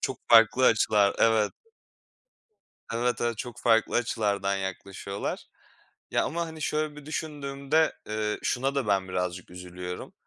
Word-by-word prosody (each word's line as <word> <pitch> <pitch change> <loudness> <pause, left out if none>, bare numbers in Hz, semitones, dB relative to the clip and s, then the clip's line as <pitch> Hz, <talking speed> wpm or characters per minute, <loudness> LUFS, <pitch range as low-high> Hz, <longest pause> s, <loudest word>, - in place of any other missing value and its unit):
çok 130 - -3
farklı 115 +2 +6
açılar. 105 -2 +3
Evet 110 -2 +3 1.4
Evet, 120 0 0
evet. 120 -2 -1
Çok 120 +1 -6
farklı 115 -1 +3
açılardan 100 -4 0
yaklaşıyorlar. 100 +1 -5 0.7
Ya - - +2
ama, 170 +1 -2
hani, 160 -1 -8
şöyle 150 0 -1
bir 150 -1 -11
düşündüğümde, 150 0 -1 0.2
eee, 105 0 -2
şuna 135 +3 0
da 135 -4 -1
ben 95 -2 +1
birazcık 90 -1 -3
üzülüyorum: 90 0 -7
115 Hz, 130 wpm, -27 LUFS, 100-140 Hz, 1.4 s, farklı